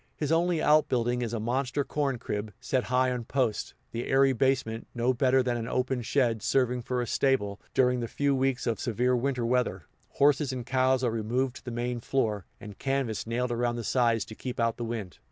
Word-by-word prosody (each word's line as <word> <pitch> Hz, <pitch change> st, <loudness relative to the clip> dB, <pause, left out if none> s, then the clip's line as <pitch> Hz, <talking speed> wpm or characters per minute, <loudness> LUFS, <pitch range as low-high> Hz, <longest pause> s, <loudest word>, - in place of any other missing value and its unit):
His 150 Hz, 0 st, -2 dB
only 170 Hz, 0 st, +2 dB
outbuilding 125 Hz, -5 st, +3 dB
is 115 Hz, -2 st, -2 dB
a 115 Hz, -, -2 dB
monster 125 Hz, +5 st, -1 dB
corn 140 Hz, -2 st, -1 dB
crib, 105 Hz, -3 st, -4 dB
set 130 Hz, 0 st, -1 dB
high 130 Hz, 0 st, +2 dB
on 125 Hz, -1 st, -3 dB
posts 125 Hz, -4 st, -1 dB, 0.2 s
the 115 Hz, +1 st, -4 dB
airy 135 Hz, 0 st, +4 dB
basement, 120 Hz, -3 st, 0 dB
no 120 Hz, +2 st, +2 dB
better 130 Hz, +1 st, +3 dB
than 125 Hz, -1 st, 0 dB
an 115 Hz, -1 st, -4 dB
open 125 Hz, 0 st, -1 dB
shed, 120 Hz, -2 st, +1 dB
serving 125 Hz, +1 st, +1 dB
for 125 Hz, +1 st, -2 dB
a -, -, -3 dB
stable; 105 Hz, -6 st, 0 dB
during 125 Hz, -1 st, +3 dB
the 120 Hz, -, -2 dB
few 140 Hz, +4 st, 0 dB
weeks 135 Hz, -1 st, 0 dB
of 115 Hz, -2 st, -1 dB
severe 125 Hz, +2 st, +1 dB
winter 125 Hz, -1 st, -1 dB
weather, 115 Hz, -8 st, 0 dB, 0.3 s
horses 140 Hz, 0 st, +3 dB
and 125 Hz, -2 st, -5 dB
cow 130 Hz, 0 st, +3 dB
are 120 Hz, -, +2 dB
removed 120 Hz, +4 st, -1 dB
to -, -, -15 dB
the -, -, -4 dB
main 120 Hz, +1 st, -2 dB
floor, 110 Hz, -6 st, -1 dB
and 105 Hz, -2 st, -10 dB
canvas 135 Hz, -6 st, -1 dB
nailed 120 Hz, +2 st, -1 dB
around 120 Hz, 0 st, 0 dB
the 120 Hz, -, -4 dB
sides 115 Hz, -1 st, +2 dB
to -, -, -10 dB
keep 125 Hz, +2 st, -6 dB
out 115 Hz, -1 st, +1 dB
the 120 Hz, -, -4 dB
wind. 110 Hz, -6 st, -5 dB
125 Hz, 210 wpm, -28 LUFS, 115-130 Hz, 0.3 s, airy